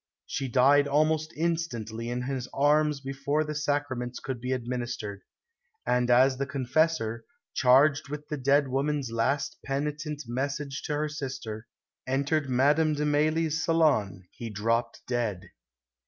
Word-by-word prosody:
She 135 - -3
died 140 +3 +4
almost 155 +2 +1
instantly 120 -9 -2
in 125 +1 -2
his 130 -1 -3
arms 150 0 +3
before 140 +3 -1
the 150 0 -4
Sacraments 145 -5 -2
could 130 -3 -5
be 125 +1 -3
administered. 120 -5 -3 0.6
And 125 0 +1
as 130 +2 +5
the 140 +1 -2
confessor, 135 -4 0 0.3
charged 140 +1 +4
with 150 0 -6
the 150 - -3
dead 140 +2 +3
woman's 135 -1 -1
last 115 +5 0
penitent 150 +2 -3
message 140 +3 -3
to 150 - -2
her 150 +1 0
sister, 130 -7 -6 0.4
entered 140 +2 0
Madame 145 +5 +3
de 150 +1 -1
Mailly's 155 +2 +1
salon, 145 - +2
he 115 - -7
dropped 115 +3 -1
dead." 115 -7 -2
140 Hz, 135 wpm, -28 LUFS, 125-150 Hz, 0.6 s, as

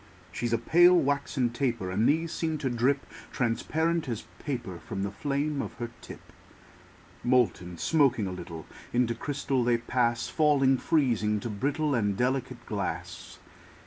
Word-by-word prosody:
She's 120 +5 -2
a 115 - +3
pale, 175 +9 +6
waxen 140 -4 0
taper; 120 -7 -1
And 105 +5 +2
these 160 +2 +1
seem 160 -2 -1
to 135 -4 -2
drip 130 +4 +1 0.3
Transparent 155 +6 0
as 115 -2 -3 0.2
paper 120 - -4
From 95 +4 -5
the 100 - -2
flame 140 +6 -1
of - - -6
her 120 0 -5
tip. - - -12 0.9
Molten, 120 -8 +1
smoking 135 - +2
a 95 - -3
little, 85 -3 -7 0.3
Into 120 -1 +2
crystal 135 0 -1
they 120 0 +3
pass; 120 0 0
Falling, 140 -4 +3
freezing, 115 -9 +1
to 115 - -4
brittle 145 +8 0
And 105 -5 +1
delicate 125 -1 -1
glass. 100 -3 -5
125 Hz, 145 wpm, -28 LUFS, 115-145 Hz, 0.9 s, pale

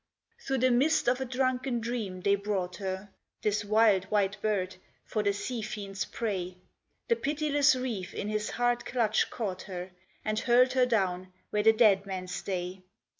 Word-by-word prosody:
Through 270 - +1
the 255 0 +3
mist 275 +6 +3
of 250 +2 +2
a - - -1
drunken 255 -1 0
dream 225 -6 -4
they 200 +2 +3
brought 200 -3 -2
her 190 0 -5 0.3
(This 210 0 +1
wild 210 -2 +4
white 200 -1 0
bird) 190 -4 -1 0.3
for 215 - -1
the 205 -1 +2
sea 230 +4 -4
fiend's 200 -3 -4
prey: 185 -5 -3 0.5
The 465 - +3
pitiless 295 - +2
reef 235 -8 -3
in 205 - -4
his 215 0 -1
hard 245 0 0
clutch 225 -4 +1
caught 190 -5 -4
her, 180 0 -6 0.3
And 215 0 0
hurled 250 +2 +4
her 255 -1 +4
down 185 -5 0 0.2
where 210 - +1
the 220 +1 +7
dead 210 -3 +4
men 185 -1 -4
stay. 185 0 -4
210 Hz, 170 wpm, -29 LUFS, 195-245 Hz, 0.5 s, the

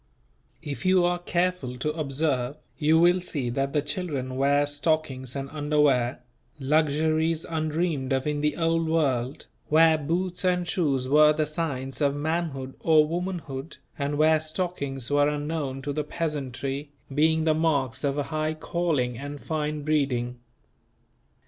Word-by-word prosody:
If 140 -5 -5
you 185 -1 +4
are 175 0 +1
careful 175 -7 -1
to 150 +4 -1
observe, 140 -3 -1 0.2
you 160 +1 +3
will 175 +2 +5
see 140 -8 -3
that 135 +2 -1
the 145 0 +1
children 145 -5 -3
wear 140 +2 +3
stockings 145 -3 -1
and 135 0 -3
underwear; 145 -5 +1 0.4
luxuries 155 +3 +1
undreamed 155 -3 -1
of 130 0 +1
in 150 -1 -1
the 150 -1 0
Old 165 -1 +1
World, 135 -5 0 0.2
where 160 0 +5
boots 175 +5 -2
and 180 -1 +1
shoes 140 -9 0
were 150 +2 +6
the 155 0 0
signs 145 -4 -3
of 140 -1 +2
manhood 145 -3 -2
or 155 -2 +5
womanhood, 165 -4 -4 0.2
and 145 0 -2
where 155 +1 +4
stockings 155 -6 -3
were 145 0 +4
unknown 145 -2 -3
to 145 +1 -2
the 150 +1 -1
peasantry, 140 -3 -3 0.2
being 160 +2 +3
the 160 -1 +3
marks 140 -5 0
of 140 0 0
a 145 - +1
high 155 0 0
calling 155 -8 -1
and 145 +1 -6
fine 150 -1 -2
breeding. 130 -5 0
150 Hz, 145 wpm, -26 LUFS, 135-160 Hz, 0.4 s, were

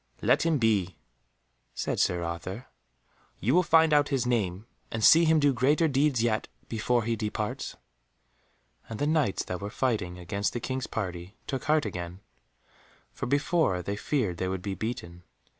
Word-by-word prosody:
"Let - - +3
him 160 -2 +3
be," 105 -7 +1 0.8
said - - -2
Sir 90 -1 +1
Arthur, 90 +7 -5 0.7
"you 115 +7 +1
will 180 - +6
find 160 -2 +4
out 145 -1 +4
his 135 -4 0
name, 105 -5 -1 0.2
and 110 -1 -3
see 165 +7 +7
him 160 0 +4
do 145 -2 +3
greater 145 +6 +3
deeds 135 -4 +2
yet, 110 -2 0 0.2
before 120 +1 0
he 115 +1 0
departs." 105 -1 -3 1.1
And 110 - -5
the 145 - 0
Knights 150 -9 +1
that 90 +1 -5
were 100 - -4
fighting 105 -8 -1
against 100 +4 -2
the 120 - -2
King's 130 +2 -3
party 90 -2 -5
took 135 -3 -4
heart 155 -1 +3
again, 90 +1 -6 0.9
for - - -5
before 145 - +1
they 100 +3 -3
feared 105 - -1
they 95 - -2
would 95 -1 -3
be 100 - -2
beaten. 90 -4 -5
115 Hz, 165 wpm, -28 LUFS, 95-145 Hz, 1.1 s, see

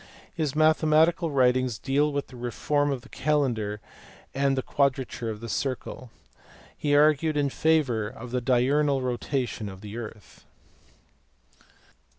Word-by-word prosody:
His 155 -5 -2
mathematical 155 +2 +3
writings 130 -3 +2
deal 145 +5 +1
with 140 0 -2
the 130 - -12
reform 145 +4 -1
of 135 -3 -2
the - - -17
calendar 125 -8 0 0.5
and 135 0 +1
the 130 - 0
quadrature 130 -4 -1
of 110 -1 -6
the 115 - -6
circle. 130 0 -4 0.7
He 145 -1 +1
argued 150 +1 +3
in 140 -2 +1
favour 135 -10 +1
of 120 +2 -9
the 125 0 -1
diurnal 135 +3 +2
rotation 125 -3 -2
of 95 -1 -11
the 105 +1 -8
earth. 110 -3 -10
135 Hz, 135 wpm, -26 LUFS, 120-150 Hz, 0.7 s, mathematical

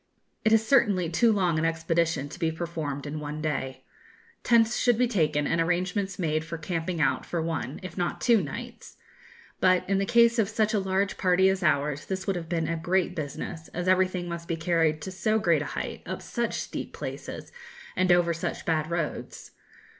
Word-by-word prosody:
It 220 - +3
is 220 0 +4
certainly 200 -10 +3
too 230 +7 +4
long 180 -6 +2
an 160 - +1
expedition 165 -2 0
to - - -10
be 165 -2 +1
performed 160 -4 -4
in 150 +1 -4
one 150 0 -5
day. 135 -4 -3 0.6
Tents 230 -1 +4
should 245 -3 +3
be 250 +1 +3
taken, 155 -9 +1
and 165 +3 +1
arrangements 180 +3 -1
made 155 -3 0
for 165 +1 -6
camping 165 +1 -3
out 150 - +2
for 170 - -3
one, 160 -5 -3
if 185 0 -7
not 175 - -1
two, 235 -4 +4
nights; 145 -5 -8 0.6
but, 185 -1 +3
in 195 0 +2
the 195 - -1
case 235 0 +5
of 205 -3 +2
such 220 0 +1
a 210 - +3
large 190 +1 -1
party 185 +1 +4
as 190 0 0
ours, 145 -3 +1
this 190 0 -3
would 195 - 0
have 165 -2 -5
been 165 -2 0
a 165 - -1
great 175 +3 0
business, 160 +2 -5
as 175 +1 -2
everything 185 -1 +2
must 170 -1 -6
be 165 - -2
carried 160 -2 +1
to 190 - -5
so 215 +4 +1
great 170 -8 +2
a - - -3
height, - - -5
up - - -5
such 235 -1 -2
steep - - -6
places, - - -7 0.4
and 185 0 +2
over 175 -1 +4
such 165 - -4
bad 155 -1 0
roads. 170 -3 -4
175 Hz, 200 wpm, -27 LUFS, 160-190 Hz, 0.6 s, case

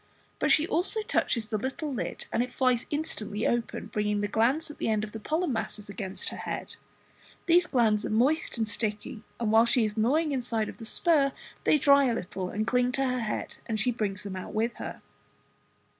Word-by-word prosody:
but - - +1
she 310 - +5
also 385 +7 +1
touches 230 - 0
the 215 - -1
little 270 +5 -3
lid 245 - -4
and 230 - +2
it 250 0 -2
flies 255 -2 +1
instantly 225 -8 -3
open, 235 -3 -1
bringing 210 -1 -1
the 205 - 0
glands 255 +10 +1
at - - -14
the - - 0
end 215 -1 +1
of 215 - -5
the 225 - -6
pollen 315 +5 -1
masses 215 -2 -3
against 195 -1 -5
her - - -7
head. - - -5 0.7
These 350 0 +5
glands 220 -5 +2
are - - -3
moist 255 +9 +2
and 220 -1 0
sticky, 215 +1 -3 0.2
and 225 -3 0
while 225 +1 +6
she 235 -1 +3
is 210 -1 -3
gnawing 285 +9 +2
the - - -1
inside 235 -4 -1
of - - -9
the 225 - -9
spur 280 +1 +3 0.3
they - - +5
dry 280 -1 +5
a 240 -3 +1
little 185 -2 -4
and 215 +3 -2
cling 250 +1 +2
to 270 +1 +1
her 255 -1 0
head 220 -2 -3
and 220 -2 -1
she 245 +4 +2
brings 205 -5 -2
them 200 -2 -5
out 185 +3 -7
with 230 +2 +1
her. - - -7
235 Hz, 215 wpm, -28 LUFS, 215-275 Hz, 0.7 s, while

